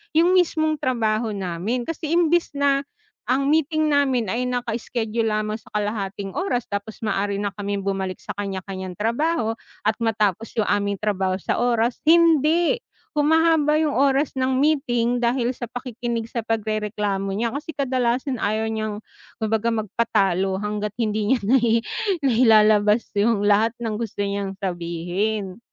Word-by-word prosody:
'yung 340 +3 +5
mismong 315 -3 +1
trabaho 225 -4 0
namin, 195 +6 -2
kasi 325 +2 -5
imbes 345 -2 +2
na 280 -1 +3 0.5
ang 275 +3 +2
meeting 310 0 +2
namin 260 -8 +2
ay 250 +2 -1
naka-schedule 235 -2 -2
lamang 215 0 -1
sa - - -26
kalahating 200 -2 -2
oras 355 -10 -1
tapos 200 +2 -5
maaari 200 -1 -1
na 205 - -1
kaming 200 -1 -3
bumalik 190 -1 -2
sa - - -5
kanya-kaniyang 190 -2 -5
trabaho 235 - 0 0.3
at 215 +1 +2
matapos 220 -1 0
'yung 215 -2 +1
aming 200 0 +1
trabaho 195 -2 -1
sa 185 - -2
oras, 240 0 +1
hindi, 335 - +4 0.4
humahaba 310 0 +3
'yung 310 -2 +1
oras 275 +2 +2
ng 260 0 +1
meeting 245 -5 +1
dahil 240 0 +1
sa 245 -1 -6
pakikinig 240 -1 -4
sa 235 - -2
pagrereklamo 210 -3 -1
niya. 230 +2 -1
Kasi 300 +2 -6
kadalasan 255 -1 0
ayaw 220 +2 0
niyang 215 -1 -3 0.4
kumbaga 220 0 0
magpatalo 195 -4 0
hangga't 210 0 -3
hindi 215 0 0
niya - - -3
nai 230 -1 +3 0.4
nailalabas 215 -3 +4
'yung 210 -1 +2
lahat 210 +3 +3
ng 220 -2 -2
gusto 215 -3 -3
niyang 200 -1 -3
sabihin. 185 +3 -2
225 Hz, 140 wpm, -23 LUFS, 205-260 Hz, 0.5 s, yung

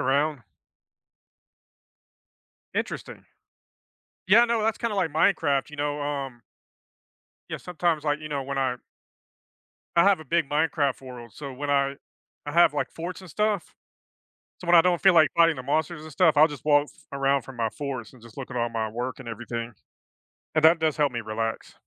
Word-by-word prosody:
around? 140 -1 +1 2.3
Interesting. - - -4 1.0
Yeah, 230 +5 +7
no, 235 -2 0
that's 225 0 0
kinda 230 -3 -2
like 180 -4 +1
Minecraft, 150 -3 +2
you 150 - -10
know, 145 0 -2
um 140 -4 -4 1.1
Yeah, - - -3
sometimes, 170 -3 -1
like, 150 0 0
you 155 - -7
know, 140 -2 -2
when 135 +1 -4
I 130 -2 0 1.2
I 170 - +6
have 200 -4 +4
a 155 - -10
big 165 0 0
Minecraft 145 -3 0
world, 125 -3 -10
so 140 -2 -7
when 145 +3 -5
I 140 0 +1 0.5
I - - -3
have, 170 -3 +5
like, - - -1
forts 175 +2 -6
and 185 -4 -12
stuff, 210 0 -1 0.9
so, 175 - -9
when 175 - +6
I 165 - +9
don't 180 -1 +1
feel 190 -1 +6
like 160 -3 +6
fighting 165 -2 +4
the 130 - -6
monsters 155 +3 -1
and 155 - -10
stuff, 160 -1 +3
I'll 155 +2 +8
just 145 -3 -9
walk 145 -1 +4
f - - -16 0.2
around 140 0 +1
from 130 +1 -12
my 115 -1 +1
forts 130 -2 -6
and 125 - -17
just 120 +3 -15
look 135 - -6
at 125 - -8
all 120 0 0
my 115 -1 -2
work 125 +4 -4
and 135 - -10
everything, 115 0 -5 0.8
and 155 - +1
that 160 +2 +7
does 155 -2 0
help 145 -3 +2
me 120 - -3
relax. 115 +1 -4
145 Hz, 185 wpm, -26 LUFS, 130-165 Hz, 2.3 s, I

